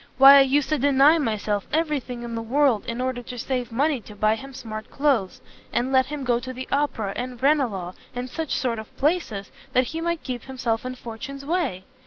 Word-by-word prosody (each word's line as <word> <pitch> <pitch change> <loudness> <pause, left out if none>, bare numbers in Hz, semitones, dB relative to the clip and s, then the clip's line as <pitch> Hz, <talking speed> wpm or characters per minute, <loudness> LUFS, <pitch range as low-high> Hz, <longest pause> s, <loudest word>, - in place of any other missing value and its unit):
why 275 +1 +10
I - - +8
used 270 +1 +2
to 305 -2 +1
deny 285 +4 +5
myself 215 -6 -1
every 305 -1 +1
thing 245 -2 -7
in 235 -1 -5
the 230 - -2
world, 250 -1 +2
in 235 +1 -3
order 255 -1 -1
to 245 +1 -8
save 250 0 -2
money 275 +2 +1
to 210 - -12
buy 215 +1 +3
him 270 +5 -7
smart 220 -5 -7
cloaths, 255 -5 0 0.3
and 250 +2 0
let 260 -1 +4
him 295 -1 -5
go 240 -2 +2
to 255 +2 -6
the 255 0 -7
Opera, 255 -8 0
and 250 -1 -5
Ranelagh, 245 -11 +1 0.2
and 245 +1 -3
such 320 +3 -3
sort 235 -3 -1
of 220 - -11
places, 275 - 0 0.2
that 255 - +4
he 325 - -3
might 340 -1 -1
keep 250 -3 -5
himself 255 -2 -2
in 255 - -5
fortune's 260 +4 -8
way! 295 - -1
255 Hz, 215 wpm, -24 LUFS, 230-280 Hz, 0.3 s, why